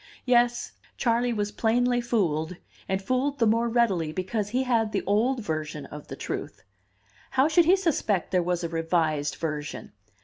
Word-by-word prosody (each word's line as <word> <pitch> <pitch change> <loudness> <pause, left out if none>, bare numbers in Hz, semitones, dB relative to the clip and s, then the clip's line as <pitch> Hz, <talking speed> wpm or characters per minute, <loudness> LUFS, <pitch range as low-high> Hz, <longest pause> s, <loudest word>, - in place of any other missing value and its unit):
Yes, 240 -1 +2 0.3
Charley 240 0 +1
was 210 -2 -1
plainly 245 +3 +1
fooled, 180 -8 0 0.3
and 190 0 +1
fooled 260 +5 0
the 235 - +3
more 230 +2 +2
readily 200 -10 +1
because 195 +5 -2
he 255 +4 0
had 230 -4 +1
the - - 0
old 235 +6 +1
version 155 -3 -4
of 150 0 -10
the - - -7
truth. - - -6 0.7
How 265 +2 +3
should 320 +2 +4
he 360 +4 +6
suspect 280 - 0
there 180 -1 +3
was 175 0 -1
a 170 - -2
revised 160 -3 0
version? 150 -2 -5
215 Hz, 165 wpm, -26 LUFS, 170-245 Hz, 0.7 s, he